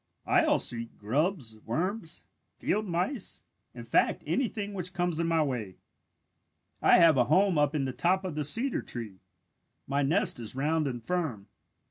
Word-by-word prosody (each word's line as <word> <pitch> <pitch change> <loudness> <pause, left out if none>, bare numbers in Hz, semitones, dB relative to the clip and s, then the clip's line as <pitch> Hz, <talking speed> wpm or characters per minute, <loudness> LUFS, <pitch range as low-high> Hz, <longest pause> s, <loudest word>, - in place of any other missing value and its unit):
I - - +3
also 120 - +2
eat 115 0 -8
grubs, 130 - -1
worms, 170 - -3 0.3
field 215 0 -1
mice, 185 +7 -2 0.3
in - - -7
fact - - +1
anything 210 -5 -1
which 180 -2 -4
comes 175 -2 0
in 170 - +1
my 165 -1 +3
way. 115 -10 -4 1.0
"I - - +6
have 165 -5 +6
a 125 - +4
home 185 +2 +3
up 145 +1 +2
in 140 -3 0
the 130 - -3
top 185 +5 +1
of 180 - -3
the 150 0 -2
cedar 230 - 0
tree. 110 -6 -7 0.7
My 140 +1 0
nest 150 0 +2
is 115 0 -7
round 155 +3 +1
and 120 -3 -5
firm. 160 - -2
160 Hz, 165 wpm, -29 LUFS, 130-180 Hz, 1.0 s, I